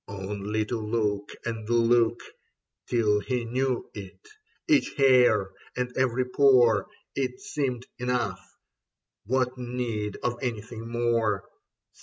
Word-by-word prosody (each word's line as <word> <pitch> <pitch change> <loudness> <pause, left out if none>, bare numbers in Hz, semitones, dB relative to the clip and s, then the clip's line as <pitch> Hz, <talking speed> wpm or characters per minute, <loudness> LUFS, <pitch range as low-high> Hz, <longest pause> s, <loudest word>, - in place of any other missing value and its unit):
Only 100 +2 -3
to 115 +1 -3
look 105 -2 -1 0.2
and 115 -2 -4
look, 120 0 +3 0.6
Till 110 -3 +2
he 120 +3 -2
knew 130 +1 -1
it, 100 -2 -10 0.4
each 305 -3 +3
hair 125 -8 +5 0.3
and 125 0 -2
every 130 -1 +1
pore 125 -5 +4
— - - -45
It 130 +9 -4
Seemed 140 - -3
enough: 125 -4 -1 0.8
what 130 +1 0
need 120 -4 -3
of 120 0 -1
anything 115 -2 -4
more 115 -4 0
120 Hz, 115 wpm, -27 LUFS, 105-125 Hz, 0.8 s, hair